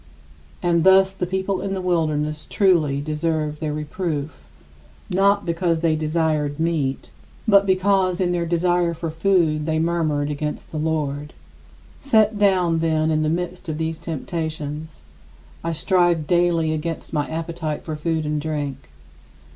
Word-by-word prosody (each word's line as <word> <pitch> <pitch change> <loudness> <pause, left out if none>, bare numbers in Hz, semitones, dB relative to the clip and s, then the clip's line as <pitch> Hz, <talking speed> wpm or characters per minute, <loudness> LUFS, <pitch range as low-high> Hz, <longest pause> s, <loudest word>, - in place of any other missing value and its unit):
And, 170 -2 +2
thus, 190 +1 +6
the 180 -2 -3
people 190 +1 -1
in 195 - -3
the 190 - -2
wilderness 155 -4 -1
truly 160 -8 +2
deserved 155 0 -2
their 155 -2 -2
reproof, 150 0 -3 0.8
not 200 +2 +3
because 170 -1 0
they 165 -2 +2
desired 155 -2 0
meat, 145 - -1 0.4
but 200 -2 +5
because 190 -1 +2
in 180 -2 +1
their 170 -1 -1
desire 175 0 +1
for 165 0 -4
food 160 -3 +1
they 160 0 +1
murmured 160 -3 0
against 150 +1 -4
the 155 - -3
Lord. 150 -2 -2 0.7
47. - - -26
Set 215 -2 +4
down, 180 -5 +3
then, 160 -1 +1
in 155 0 +1
the 155 - +1
midst 175 +1 -3
of 155 - -2
these 160 0 -3
temptations, 160 - -5 0.6
I 165 - -1
strive 175 -1 +2
daily 170 -1 +2
against 160 +1 -4
my 150 -2 -1
appetite 160 -1 -4
for 155 - -4
food 160 0 -1
and 150 0 -1
drink. 145 - -4
160 Hz, 145 wpm, -22 LUFS, 155-175 Hz, 0.8 s, thus